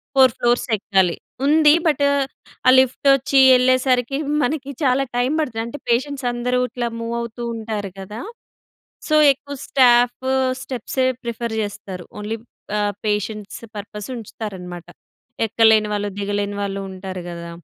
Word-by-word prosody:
Four 260 Hz, -2 st, +7 dB
floors 240 Hz, 0 st, +2 dB
ఎక్కాలి. 190 Hz, -4 st, +2 dB, 0.3 s
ఉంది. 300 Hz, +1 st, +6 dB
But, 295 Hz, -2 st, +2 dB, 0.6 s
ఆ -, -, +9 dB
లిఫ్ట్ 260 Hz, +2 st, +1 dB
వచ్చి 275 Hz, +1 st, 0 dB, 0.2 s
వెళ్ళేసరికి 255 Hz, 0 st, +2 dB, 0.3 s
మనకి 280 Hz, +1 st, -2 dB
చాలా 265 Hz, +1 st, +3 dB
టైం 245 Hz, +3 st, +1 dB
పడతది. 225 Hz, -7 st, -3 dB
అంటే, 265 Hz, +5 st, -7 dB
పేషెంట్స్ 265 Hz, +3 st, 0 dB
అందరూ 250 Hz, +1 st, 0 dB
ఇట్లా 240 Hz, -1 st, -3 dB
మూవ్ 230 Hz, +1 st, -3 dB
అవుతూ 235 Hz, +1 st, -6 dB
ఉంటారు 215 Hz, -3 st, -4 dB
కదా! 210 Hz, +3 st, -7 dB, 0.9 s
సో, 310 Hz, -, +2 dB, 0.2 s
ఎక్కువ 280 Hz, +1 st, -9 dB
స్టాఫ్ 245 Hz, -1 st, +4 dB, 0.4 s
స్టెప్సే 255 Hz, +1 st, -2 dB, 0.2 s
ప్రిఫర్ 235 Hz, -1 st, -3 dB
చేస్తారు. 200 Hz, -3 st, -7 dB
ఓన్లీ 215 Hz, +2 st, -4 dB, 0.4 s
ఆహ్, 205 Hz, -1 st, 0 dB
పేషెంట్స్ 210 Hz, +1 st, -3 dB
పర్పస్ 210 Hz, +1 st, -7 dB
ఉంచుతారన్నమాట. 190 Hz, -6 st, -7 dB, 0.6 s
ఎక్కలేని 220 Hz, -1 st, +4 dB
వాళ్ళు, 205 Hz, 0 st, -1 dB
దిగలేని 205 Hz, 0 st, -2 dB
వాళ్ళు 195 Hz, 0 st, -3 dB
ఉంటారు 185 Hz, 0 st, -7 dB
కదా! 170 Hz, 0 st, -7 dB
230 Hz, 130 wpm, -21 LUFS, 205-255 Hz, 0.9 s, ఆ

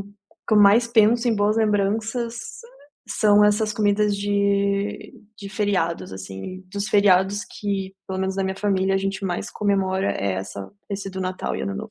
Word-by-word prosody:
o -, -, -7 dB, 0.4 s
que 220 Hz, -, +3 dB
eu 210 Hz, -, +6 dB
mais 210 Hz, +4 st, +6 dB
penso 230 Hz, +1 st, +3 dB
em 230 Hz, -, +2 dB
boas 205 Hz, +2 st, +2 dB
lembranças 220 Hz, +3 st, 0 dB, 0.7 s
sã 215 Hz, -, 0 dB
são 210 Hz, 0 st, +6 dB
essas 210 Hz, +1 st, +2 dB
comidas 205 Hz, 0 st, +1 dB
de 200 Hz, 0 st, 0 dB, 0.2 s
de 200 Hz, -1 st, -8 dB
feriados 195 Hz, -, -1 dB
assim, 95 Hz, -, -8 dB
dos 200 Hz, 0 st, -2 dB
feriados 200 Hz, 0 st, +3 dB
que, 195 Hz, -2 st, -4 dB
pelo 190 Hz, 0 st, -3 dB
menos 190 Hz, 0 st, -2 dB
na 195 Hz, -, 0 dB
minha 190 Hz, 0 st, -3 dB
família, 195 Hz, -1 st, +1 dB
a -, -, +2 dB
gente 195 Hz, 0 st, -3 dB
mais 175 Hz, -2 st, -3 dB
comemora 190 Hz, -, 0 dB
é 100 Hz, -1 st, -2 dB
essa 95 Hz, +1 st, -6 dB, 0.2 s
esse 195 Hz, -1 st, -4 dB
do 190 Hz, 0 st, -6 dB
Natal 185 Hz, 0 st, -3 dB
e -, -, -4 dB
Ano 195 Hz, -, -3 dB
Novo, 215 Hz, +2 st, -7 dB
200 Hz, 180 wpm, -23 LUFS, 190-210 Hz, 0.7 s, eu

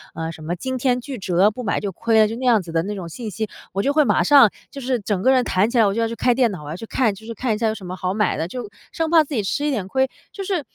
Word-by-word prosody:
呃， 165 Hz, 0 st, -3 dB
什 160 Hz, -1 st, -11 dB
么 170 Hz, +3 st, -2 dB
惊 260 Hz, +8 st, -4 dB
天 250 Hz, -1 st, +1 dB
巨 265 Hz, -1 st, -6 dB
折， 190 Hz, +2 st, +2 dB
不 250 Hz, -, -7 dB
买 210 Hz, -, -1 dB
就 200 Hz, -2 st, -3 dB
亏 225 Hz, +4 st, +1 dB
了， 215 Hz, -, +6 dB
就 225 Hz, +2 st, -5 dB
那 255 Hz, -, -4 dB
样 230 Hz, -4 st, +4 dB
子 170 Hz, -2 st, -9 dB
的 165 Hz, 0 st, +1 dB
那 205 Hz, +2 st, -4 dB
种 175 Hz, -3 st, -6 dB
信 225 Hz, +5 st, -6 dB
息， 220 Hz, 0 st, -4 dB, 0.2 s
我 195 Hz, -, 0 dB
就 280 Hz, -, +2 dB
会 300 Hz, -1 st, +3 dB
马 -, -, +3 dB
上 275 Hz, -7 st, +7 dB, 0.2 s
就 280 Hz, -, -8 dB
是 255 Hz, -1 st, 0 dB
整 200 Hz, -2 st, -2 dB
个 260 Hz, -, +4 dB
人 255 Hz, -1 st, +4 dB
弹 200 Hz, +2 st, +1 dB
起 245 Hz, -, -1 dB
来， 225 Hz, -, +6 dB
我 200 Hz, -, +1 dB
就 230 Hz, -, -1 dB
要 225 Hz, -, +1 dB
去 230 Hz, -, -5 dB
开 245 Hz, -, +2 dB
电 245 Hz, -4 st, +3 dB
脑， 175 Hz, -6 st, -7 dB
我 145 Hz, -, -8 dB
要 155 Hz, -, -4 dB
去 225 Hz, -, -8 dB
看， 225 Hz, -3 st, +1 dB
就 210 Hz, +3 st, -13 dB
是 230 Hz, -, -6 dB
看 230 Hz, +1 st, -1 dB
一 -, -, -4 dB
下 225 Hz, 0 st, 0 dB
有 215 Hz, -, +1 dB
什 195 Hz, -4 st, -10 dB
么 180 Hz, +1 st, -5 dB
好 185 Hz, +1 st, -2 dB
买 210 Hz, -2 st, +1 dB
的， 160 Hz, -, -2 dB
就 235 Hz, +2 st, -6 dB, 0.2 s
生 325 Hz, -1 st, -1 dB
怕 325 Hz, -2 st, +6 dB
自 295 Hz, -, -8 dB
己 210 Hz, -, 0 dB
吃 285 Hz, +9 st, -1 dB
一 295 Hz, -, +1 dB
点 205 Hz, -7 st, -2 dB
亏。 265 Hz, +5 st, +1 dB, 0.2 s
就 395 Hz, -, -6 dB
是 370 Hz, -4 st, -1 dB
220 Hz, 375 characters per minute, -21 LUFS, 190-255 Hz, 0.2 s, 上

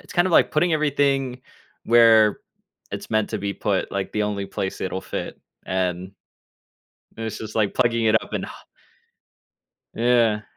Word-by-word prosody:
it's -, -, -13 dB
kind 175 Hz, 0 st, +3 dB
of 185 Hz, -, -1 dB
like -, -, +5 dB
putting 170 Hz, +3 st, +1 dB
everything 140 Hz, -4 st, 0 dB, 0.4 s
where 115 Hz, -2 st, +5 dB, 0.5 s
it's -, -, -6 dB
meant 110 Hz, -1 st, 0 dB
to 110 Hz, -, -2 dB
be 100 Hz, 0 st, -3 dB
put, 100 Hz, -3 st, -1 dB
like 100 Hz, -1 st, -3 dB
the 105 Hz, -, 0 dB
only 100 Hz, -1 st, -3 dB
place 95 Hz, -, -4 dB
it'll 95 Hz, 0 st, -3 dB
fit, -, -, -6 dB, 0.3 s
and 95 Hz, 0 st, -2 dB, 1.0 s
this 115 Hz, -1 st, -5 dB
is 110 Hz, -1 st, -7 dB
like 105 Hz, -3 st, 0 dB
plugging 115 Hz, -2 st, +1 dB
it 110 Hz, 0 st, +4 dB
up -, -, -13 dB
and -, -, -2 dB
h -, -, -8 dB, 1.4 s
Yeah. 115 Hz, -2 st, +2 dB
110 Hz, 160 wpm, -23 LUFS, 100-125 Hz, 1.4 s, like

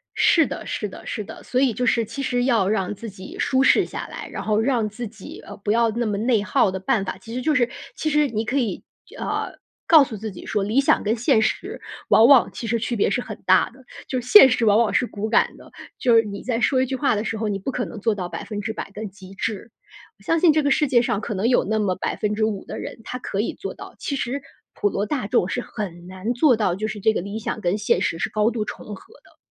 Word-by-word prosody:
是 325 Hz, -2 st, +4 dB
的， -, -, -6 dB
是 210 Hz, -, -3 dB
的， -, -, -12 dB
是 215 Hz, -, -4 dB
的。 -, -, -11 dB
所 255 Hz, -, 0 dB
以 265 Hz, -4 st, +3 dB
就 250 Hz, +4 st, -1 dB
是 230 Hz, -1 st, +2 dB
其 230 Hz, +6 st, -6 dB
实 245 Hz, -2 st, 0 dB
要 230 Hz, -7 st, +2 dB
让 195 Hz, -2 st, 0 dB
自 225 Hz, +3 st, -8 dB
己 190 Hz, -1 st, -10 dB
舒 265 Hz, -1 st, +2 dB
适 -, -, +5 dB
下 -, -, -6 dB
来， -, -, -8 dB
然 -, -, -5 dB
后 215 Hz, -1 st, +1 dB
让 230 Hz, -2 st, +1 dB
自 235 Hz, +3 st, -6 dB
己， 210 Hz, -2 st, -11 dB
呃， -, -, -9 dB
不 205 Hz, 0 st, -2 dB
要 230 Hz, +1 st, +3 dB
那 235 Hz, +2 st, -2 dB
么 210 Hz, -2 st, -1 dB
内 225 Hz, 0 st, +2 dB
耗 205 Hz, -, +2 dB
的 190 Hz, -, -4 dB
办 195 Hz, +2 st, 0 dB
法， 190 Hz, -, -4 dB
其 205 Hz, +5 st, -11 dB
实 250 Hz, -, -3 dB
就 305 Hz, +3 st, +1 dB
是 245 Hz, -2 st, +3 dB, 0.3 s
其 310 Hz, -, -1 dB
实 300 Hz, -1 st, +3 dB
你 225 Hz, -3 st, -2 dB
可 240 Hz, +5 st, -1 dB
以 240 Hz, -6 st, -1 dB, 0.2 s
就 -, -, -15 dB
呃， -, -, -3 dB, 0.3 s
告 315 Hz, -3 st, +8 dB
诉 250 Hz, -6 st, -6 dB
自 215 Hz, +1 st, -5 dB
己 180 Hz, -, -11 dB
说： 210 Hz, -2 st, -1 dB
“理 230 Hz, +7 st, +2 dB
想 -, -, +2 dB
跟 215 Hz, +2 st, +1 dB
现 225 Hz, -1 st, +3 dB
实 215 Hz, -, -2 dB, 0.3 s
往 225 Hz, -, +7 dB
往 275 Hz, -3 st, +6 dB
其 230 Hz, -, -6 dB
实 230 Hz, +1 st, +1 dB
区 235 Hz, +2 st, -2 dB
别 205 Hz, -, +2 dB
是 225 Hz, -, 0 dB
很 -, -, -8 dB
大 -, -, +4 dB
的， 260 Hz, +1 st, -19 dB, 0.2 s
就 255 Hz, -, -1 dB
是 245 Hz, -, -9 dB
现 420 Hz, -7 st, +9 dB
实 245 Hz, -2 st, +1 dB
往 210 Hz, -1 st, +5 dB
往 230 Hz, -3 st, +2 dB
是 250 Hz, -, +2 dB
骨 215 Hz, 0 st, -4 dB
感 230 Hz, -, +2 dB
的。 -, -, -16 dB, 0.3 s
就 240 Hz, -2 st, +3 dB
是 225 Hz, -, +6 dB
你 200 Hz, -2 st, -7 dB
在 240 Hz, -2 st, -1 dB
说 260 Hz, +1 st, +2 dB
一 -, -, +2 dB
句 265 Hz, -, -3 dB
话 270 Hz, -3 st, +1 dB
的 210 Hz, -, -1 dB
时 225 Hz, 0 st, -3 dB
候， 220 Hz, -, -2 dB
你 205 Hz, -2 st, -1 dB
不 195 Hz, +7 st, -4 dB
可 250 Hz, -1 st, -2 dB
能 225 Hz, -, -8 dB
做 225 Hz, +1 st, +1 dB
到 185 Hz, -3 st, -4 dB
100% 205 Hz, +4 st, -5 dB
的 215 Hz, +2 st, -6 dB
极 190 Hz, -1 st, -13 dB
致。 220 Hz, +2 st, -4 dB, 0.5 s
我 200 Hz, -, -22 dB
相 330 Hz, +10 st, +1 dB
信 335 Hz, -1 st, +6 dB
这 310 Hz, -, +3 dB
个 285 Hz, -, +2 dB
世 300 Hz, +1 st, +3 dB
界 245 Hz, -2 st, +4 dB
上 215 Hz, -4 st, -1 dB
可 210 Hz, -, -4 dB
能 200 Hz, +3 st, 0 dB
有 245 Hz, -, +3 dB
那 220 Hz, +2 st, -1 dB
么 195 Hz, -3 st, 0 dB
5% 210 Hz, +1 st, -2 dB
的 -, -, -6 dB
人， -, -, -7 dB
他 250 Hz, -, -5 dB
可 200 Hz, -5 st, -4 dB
以 215 Hz, -, -1 dB
做 -, -, -6 dB
到。 -, -, -11 dB
其 280 Hz, -, -3 dB
实 270 Hz, +1 st, -3 dB, 0.3 s
普 205 Hz, -, 0 dB
罗 200 Hz, +1 st, -1 dB
大 255 Hz, -5 st, -2 dB
众 180 Hz, -, +2 dB
是 245 Hz, -, -2 dB
很 175 Hz, -7 st, -7 dB
难 190 Hz, +5 st, -3 dB
做 250 Hz, +1 st, +4 dB
到， 195 Hz, -5 st, +1 dB
就 215 Hz, +3 st, -3 dB
是 215 Hz, 0 st, -5 dB
这 220 Hz, +2 st, +3 dB
个 -, -, -1 dB
理 200 Hz, +4 st, -5 dB
想 220 Hz, -, -4 dB
跟 180 Hz, +1 st, 0 dB
现 210 Hz, -, +1 dB
实 165 Hz, -, -1 dB
是 -, -, -1 dB
高 215 Hz, +1 st, +2 dB
度 225 Hz, -3 st, -2 dB
重 -, -, -8 dB
合 305 Hz, -, -17 dB
的。 -, -, -23 dB
220 Hz, 290 characters per minute, -23 LUFS, 205-245 Hz, 0.5 s, 现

